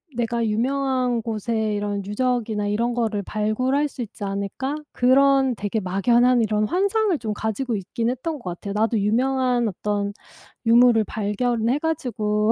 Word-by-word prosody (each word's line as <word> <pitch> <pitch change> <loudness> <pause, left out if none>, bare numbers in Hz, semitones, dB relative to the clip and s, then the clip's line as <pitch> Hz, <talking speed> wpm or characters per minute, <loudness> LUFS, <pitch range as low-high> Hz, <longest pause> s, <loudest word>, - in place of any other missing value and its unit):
내가 235 0 -1
유명한 250 +1 0
곳에 220 -1 -2
이런 205 -1 -2
유적이나 220 -1 -1
이런 230 +4 0
거를 220 -4 -1
발굴할 255 +9 0
수 270 - -8
있지 220 -1 -9
않을까?' 200 +8 -3 0.2
그런 265 0 +4
되게 210 +1 -2
막연한 235 +6 +3
이런 215 -1 +1
환상을 395 - +1
좀 215 -2 -3
가지고 220 +3 -2
있긴 225 +4 -2
했던 300 +5 -4
것 185 -7 -5
같아요. 200 -1 -5
'나도 220 +1 +1
유명한 250 +3 +1
어떤 205 0 -2 0.5
유물을 235 -1 +5
발견해 230 +5 -1
가지고 220 -9 0
230 Hz, 315 characters per minute, -23 LUFS, 210-255 Hz, 0.5 s, 유물을